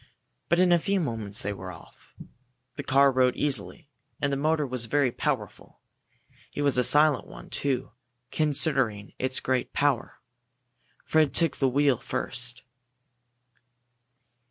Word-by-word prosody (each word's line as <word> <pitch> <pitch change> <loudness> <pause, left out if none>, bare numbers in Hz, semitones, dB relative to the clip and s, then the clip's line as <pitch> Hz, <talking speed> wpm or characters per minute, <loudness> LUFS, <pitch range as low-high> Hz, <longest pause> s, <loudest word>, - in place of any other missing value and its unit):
But 170 - +3
in 180 0 +4
a 175 - +5
few 195 +4 0
moments 110 - -3
they 100 - -2
were 95 -1 -8
off. 85 - -17 0.6
The - - -5
car 140 +1 +4
rode 130 -1 +2
easily, 145 +3 -3 0.3
and 140 -1 0
the - - +1
motor 155 +2 0
was 125 -3 -2
very 140 +1 +1
powerful. 125 -8 -4 0.8
It 145 - -2
was 140 -3 +2
a - - +3
silent 150 +1 +4
one, - - -13
too, 135 -5 -2 0.4
considering 135 -9 +1
its 130 0 0
great 130 -1 -2
power. 140 -4 0 0.9
Fred 155 -3 +2
took 165 -3 +2
the 135 - +2
wheel 140 -1 +2
first. 125 0 -2
135 Hz, 135 wpm, -26 LUFS, 125-150 Hz, 0.9 s, a